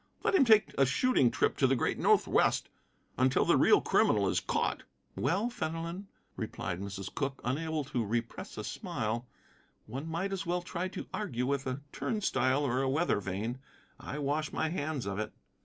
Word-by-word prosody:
Let - - +2
him 330 -8 +6
take 220 -2 +5
a 135 - +6
shooting 140 - +3
trip - - +1
to 135 - +4
the 135 - +3
great 120 - 0
Northwest - - +3 0.5
until 130 0 +3
the - - +4
real - - +5
criminal - - +3
is - - +2
caught." - - -1 0.3
"Well, 195 - 0
Fenelon," 165 +1 -4 0.3
replied 90 +2 -4
Mrs. 100 -1 -6
Cooke, 135 -1 -2
unable 155 +5 -1
to 125 -3 -2
repress 115 +2 -3
a - - -4
smile, 115 +3 -3 0.6
"one 135 +8 -6
might 185 +5 -2
as 195 - -2
well 175 +1 -1
try 180 +1 -3
to 185 - -6
argue 125 - -2
with 140 0 -1
a 130 +2 -3
turn 215 - -2
stile 135 -6 +2
or 130 0 +1
a 135 - +1
weather 145 -4 +2
vane. 105 +6 -3 0.4
I 140 - -6
wash 150 +1 -1
my 160 - 0
hands 155 -5 -2
of 100 +1 -3
it." 110 - -3
140 Hz, 180 wpm, -31 LUFS, 125-170 Hz, 0.6 s, him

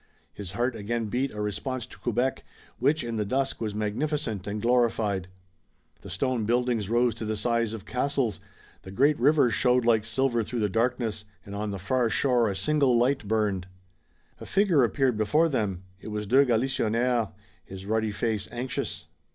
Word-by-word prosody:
His 95 -3 -7
heart 120 +3 0
again 110 +1 -3
beat 130 +5 -1
a 105 - -8
response 120 +4 -3
to - - -14
Quebec 125 +3 -1 0.4
which 145 +4 +2
in 115 -1 -3
the 105 - +1
dusk 135 +6 -1
was 105 -2 -2
magnificent 110 0 -2
and 105 +1 -3
glorified. 115 -5 +1 0.7
The - - -10
stone 130 -4 -1
buildings 120 -3 0
rose 120 0 +3
to 115 - -7
the 110 0 -2
size 115 -1 0
of 110 -3 -7
castles, 125 -2 -1 0.4
the - - -11
great 140 +9 +2
river 145 -5 +4
showed 125 +1 +3
like 115 -2 +4
silver 120 +2 +1
through 115 +2 -3
the 105 - +1
darkness 115 -1 -1 0.2
and 100 - -9
on 105 +1 -3
the 100 - -4
far 115 +6 0
shore 120 -1 +2
a 100 - -3
single 130 +5 +2
light 125 -2 +1
burned. 100 -4 0 0.7
A - - -9
figure 190 -8 +3
appeared 125 -1 +1
before 150 +10 +3
them. 105 - -2 0.2
It - - -10
was 105 0 -3
de 130 +7 +5
Galisonnière, 120 -1 +1 0.3
his 95 0 -10
ruddy 110 +1 0
face 105 0 -2
anxious. 125 +1 -4
115 Hz, 175 wpm, -27 LUFS, 105-130 Hz, 0.7 s, de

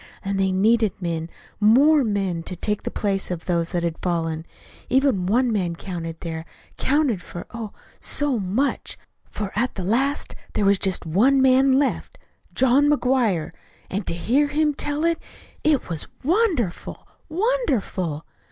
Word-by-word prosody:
And 195 0 -1
they 190 -1 +2
needed 215 +2 +2
men 165 -2 -3 0.3
more 275 +8 +5
men 195 -6 -1
to 180 - -5
take 210 +4 -1
the - - -4
place 195 -2 -1
of 175 -2 -4
those 170 -2 0
that 175 -2 -1
had 170 -1 -2
fallen. 165 -2 -2 0.4
Even 255 -8 +2
one 240 +4 +2
man 180 -5 -1
counted 165 -3 -6
there 160 -1 -4 0.3
counted 275 - +1
for, 175 - -8
oh, 230 -3 -6 0.3
so 290 -5 0
much! 210 +9 -1 0.3
for 205 -2 -4
at 240 +5 0
the 190 - -4
last 265 +9 0 0.2
there 210 - +1
was 200 -1 +4
just 190 -3 0
one 230 - +3
man 265 +1 +5
left 280 -1 -1 0.3
John 265 +3 +3
McGuire. 245 - +1 0.4
And 200 0 -3
to - - -1
hear 260 +12 +2
him 300 +1 +1
tell 295 +2 -1
it 335 -1 +1 0.4
it 305 -4 +2
was 165 -3 -5 0.2
wonderful, 320 - 0 0.2
wonderful!" 280 - -1
210 Hz, 150 wpm, -23 LUFS, 180-275 Hz, 0.4 s, more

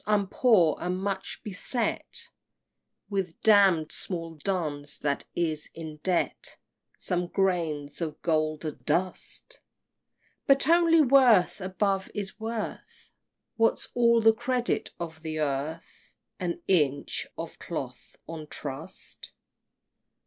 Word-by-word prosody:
I'm 210 -1 +3
poor, 190 - +4
and 180 +1 -1
much 195 0 -3
beset 220 +4 -2 0.8
With 190 -4 -2
damn'd 195 -7 +5
small 165 -3 -3
duns 150 -4 -2
that 145 -1 -1
is 160 -3 -1
in 160 -2 -7
debt 175 +3 -1 0.4
Some 180 -1 +1
grains 170 -6 0
of 155 -2 -3
golden 155 -2 0
dust! 185 - -2 0.9
But 275 0 +4
only 330 -1 +6
worth, 250 -9 +5
above, 190 +1 0
is 205 0 -4
worth. 225 0 -6 0.5
What's 225 0 +2
all 235 -1 +4
the 225 0 +6
credit 250 +2 -1
of 165 -2 -6
the 155 -1 -4
earth? 150 +2 -4 0.2
An 175 -1 -3
inch 150 -7 +1
of - - -7
cloth - - -6
on 160 -2 -7
trust? 150 +5 -7
180 Hz, 110 wpm, -28 LUFS, 155-210 Hz, 0.9 s, only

